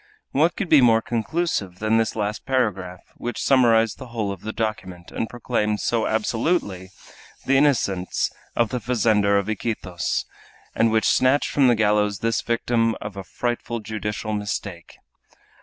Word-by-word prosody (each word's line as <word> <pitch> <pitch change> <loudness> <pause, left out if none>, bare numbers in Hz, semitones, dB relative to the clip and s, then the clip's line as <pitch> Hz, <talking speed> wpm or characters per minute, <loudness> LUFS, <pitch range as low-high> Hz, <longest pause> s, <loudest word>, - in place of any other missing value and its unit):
What 160 +5 +2
could 210 - -3
be 155 -4 +6
more 115 -2 +4
conclusive 115 - -2
than 110 +2 +1
this 110 -2 -1
last 105 -1 -2
paragraph, 95 -9 -1 0.2
which 120 0 -4
summarized 115 -5 +3
the 130 - -8
whole 110 -4 -3
of 95 -2 -7
the 110 - -4
document, 95 -6 -4
and 115 - -3
proclaimed 105 -4 -1
so 115 -2 0
absolutely 110 - -1 0.6
the 135 - +3
innocence 120 -10 +1 0.2
of 115 -2 +2
the 125 - -2
fazender 110 -4 +2
of 100 0 -1
Iquitos, 100 - -2 0.5
and 115 - +3
which 110 0 +2
snatched 130 +3 +3
from 140 -3 +4
the 120 - +5
gallows 105 -2 +2
this 115 +3 0
victim 115 -1 0
of 105 -1 -7
a 100 - -6
frightful 120 +2 -3
judicial 105 0 -4
mistake! 100 -4 -5
110 Hz, 155 wpm, -23 LUFS, 105-120 Hz, 0.6 s, be